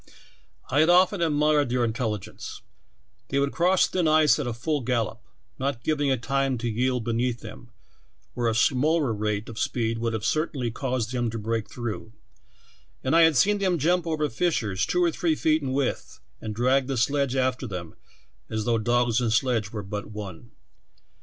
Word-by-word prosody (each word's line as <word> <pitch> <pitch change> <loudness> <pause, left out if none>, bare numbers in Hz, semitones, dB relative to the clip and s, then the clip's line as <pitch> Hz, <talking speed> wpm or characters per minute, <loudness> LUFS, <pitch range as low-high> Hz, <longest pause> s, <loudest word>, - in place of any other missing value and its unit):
I 145 - +3
had 160 +2 +4
often 180 +1 +4
admired 150 -3 +2
their 125 0 +1
intelligence; 110 -3 -4 0.6
they 140 - -2
would 140 0 +1
cross 180 +2 +3
thin 180 -3 0
ice 155 -1 +4
at 140 - -2
a - - -1
full 145 +4 -1
gallop, 120 -1 -1 0.4
not 130 -3 -2
giving 145 -2 +1
it 130 -3 0
time 135 -1 0
to 120 +1 -3
yield 125 +2 0
beneath 120 +1 -1
them, - - -11 0.6
where 120 -1 -1
a 110 - -1
slower 140 +2 +2
rate 105 0 -2
of 115 -1 -7
speed 115 -2 -1
would 115 0 -1
have 110 -2 -3
eertainly 140 -6 -1
caused 125 -3 -2
them 120 -2 -1
to 115 - -5
break 110 0 -2
through; 115 -2 -6 0.9
and 130 +5 +1
I 165 - +7
had 160 -4 +5
seen 205 +10 +3
them 185 -3 +1
jump 170 +3 +1
over 155 -2 0
fissures 115 - -1
two 180 0 +1
or 170 - +3
three 160 0 0
feet 155 0 +2
in 135 -2 -3
width 135 -1 -2 0.2
and 110 -1 -5
drag 130 +3 +2
the 135 -2 -2
sledge 140 +2 +1
after 130 0 0
them 90 -5 -6 0.6
as 110 -1 -2
though 115 -1 +2
dogs 120 +1 +2
and 120 -2 0
sledge 115 -2 +1
were 105 -2 -5
but 100 +1 -5
one. 105 0 -8
125 Hz, 185 wpm, -25 LUFS, 115-150 Hz, 0.9 s, I